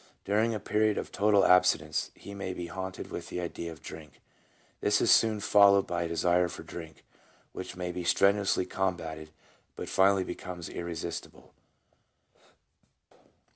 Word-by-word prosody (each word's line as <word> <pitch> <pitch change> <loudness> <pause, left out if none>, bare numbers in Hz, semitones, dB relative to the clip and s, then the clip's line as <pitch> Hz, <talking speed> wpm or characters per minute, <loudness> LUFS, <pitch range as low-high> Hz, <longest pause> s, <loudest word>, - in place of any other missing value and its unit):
During 110 +3 +1
a - - -3
period 105 +1 +1
of - - -4
total 100 -1 +3
abstinence 90 -4 +3
he 100 - -10
may 95 -2 -5
be 90 - -5
haunted 95 +1 -6
with - - -6
the - - -4
idea 85 -1 -5
of 80 - -13
drink; 75 -2 -10 0.6
this - - +2
is - - +3
soon 110 -2 +4
followed 100 -1 +5
by 85 -1 -2
a 85 - -1
desire 85 +2 +2
for - - -8
drink, 80 -2 -10 0.5
which 95 - -7
may 90 -1 -4
be 90 0 -5
strenuously 100 +2 +2
combatted, 80 -5 -3 0.5
but - - -6
finally 95 0 +4
becomes 90 -2 -7
irresistible. 85 -2 -6
90 Hz, 145 wpm, -29 LUFS, 85-100 Hz, 0.6 s, followed